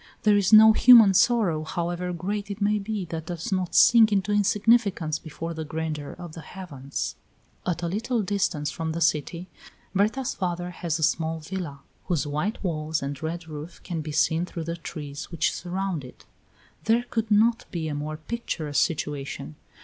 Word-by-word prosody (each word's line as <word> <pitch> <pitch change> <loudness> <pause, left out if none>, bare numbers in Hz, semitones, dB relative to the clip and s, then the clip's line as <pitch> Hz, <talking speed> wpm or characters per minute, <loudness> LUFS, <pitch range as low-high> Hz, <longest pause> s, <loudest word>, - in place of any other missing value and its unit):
There 210 -1 +5
is 200 -1 +2
no 220 0 +9
human 225 -4 +8
sorrow, 195 -7 +3
however 175 +2 -3
great 200 +4 -3
it 200 0 -5
may 210 +1 +2
be, 205 -1 -3
that 160 -1 -5
does 175 +5 -5
not 185 -2 -1
sink 225 -2 +7
into 200 0 +1
insignificance 205 -5 +2
before 165 +1 -6
the 160 -1 -5
grandeur 155 -2 -4
of 175 -3 -9
the 165 - -8
heavens. 140 -8 -6 0.5
At 175 -1 -1
a - - 0
little 220 +5 -1
distance 185 -6 -1
from 160 -1 -3
the 165 - -3
city 165 +3 0 0.5
Berta's 215 +7 +1
father 175 -1 -3
has 170 -2 -2
a 160 - -3
small 160 +1 +1
villa, 160 -4 -6 0.2
whose 170 -5 0
white 150 +11 -2
walls 155 -4 -2
and 140 0 -5
red 165 +1 -4
roof 155 +2 -8
can 170 -3 -4
be 155 0 -6
seen 160 +2 +2
through 170 -2 -5
the 170 +1 -4
trees 150 -4 -7
which 170 -2 0
surround 185 -3 -3
it. 125 - -13 0.6
There 230 +2 +3
could 225 -2 -1
not 225 +2 +3
be 165 -5 -3
a 155 - -3
more 150 +1 -4
picturesque 155 -5 -1
situation. 145 - -4
175 Hz, 175 wpm, -25 LUFS, 155-205 Hz, 0.6 s, no